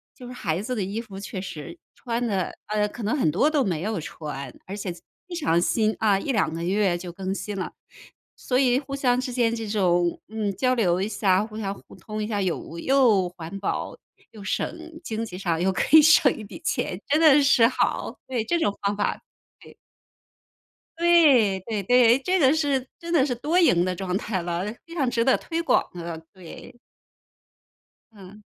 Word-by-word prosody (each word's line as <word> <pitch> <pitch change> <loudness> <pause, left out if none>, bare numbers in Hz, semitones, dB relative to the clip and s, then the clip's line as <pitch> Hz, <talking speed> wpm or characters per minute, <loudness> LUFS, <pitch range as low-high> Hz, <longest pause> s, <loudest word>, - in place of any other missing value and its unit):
就 250 - -12
是 245 - -8
孩 175 -7 -2
子 250 +4 -4
的 215 - -2
衣 200 +4 -3
服 200 -4 -10
确 190 -1 -6
实 175 - -8 0.2
穿 240 -1 -3
的， 195 -6 -1
呃， 210 0 0
可 230 +2 -9
能 220 +8 0
很 205 - +2
多 195 - +2
都 295 -3 +2
没 170 -5 -1
有 210 -2 -2
穿， 145 -4 -7
而 195 +2 -6
且 190 -4 -4 0.3
非 355 - -6
常 170 - +1
新 215 +4 +1
啊， 205 -3 +3
1-2 205 - 0
个 165 +1 -4
月 185 -1 +1
就 175 0 -7
更 190 +2 -4
新 205 -1 -5
了， 185 - -4 0.6
所 250 - -1
以 250 -2 +3
互 275 -1 -6
相 250 -2 +1
之 255 -1 -4
间 235 -2 +1
这 225 - -5
种， 175 -4 +1
嗯， 215 -2 -2
交 255 +5 +1
流 185 -6 +1
一 200 - 0
下， 200 -2 +2
互 215 -1 -10
相 200 -2 -3
互 - - -16
通 215 0 -6
一 - - -3
下， 210 -2 -2
有 170 -2 -3
又 230 -9 +3
环 175 +1 -8
保 195 - -3 0.3
又 210 -3 -11
省 - - -1 0.4
经 225 -3 -3
济 180 -4 -8
上 170 -4 -1
又 190 +1 +2
可 295 +10 +4
以 - - +9
省 300 -3 +5
一 215 - -8
笔 200 - -10
钱， 180 - -2
真 300 +2 +2
的 295 -2 +7
是 265 -4 +5
好， 255 - -1
对 245 -4 -1
这 340 +9 0
种 205 -10 +1
方 200 +1 +1
法 205 - -1 0.4
对。 - - -16 1.2
对 290 - +5
对 210 0 -3
对， 245 +2 +5
哎 270 - -3
这 370 +1 +2
个 270 -3 +5
是 280 -5 0
真 340 -1 -7
的 295 -6 +4
是 260 - -1
多 310 +9 +1
赢 175 - +4
的 185 0 -1
状 180 0 -3
态 195 -4 -3
了， 175 +1 -3 0.2
非 335 - -12
常 270 -6 +1
值 235 -1 0
得 265 - +4
推 335 0 -3
广 335 - +3
的， 170 -2 -6 0.2
对。 190 +7 -12 1.3
嗯。 205 0 -14
215 Hz, 215 characters per minute, -24 LUFS, 185-255 Hz, 1.3 s, 以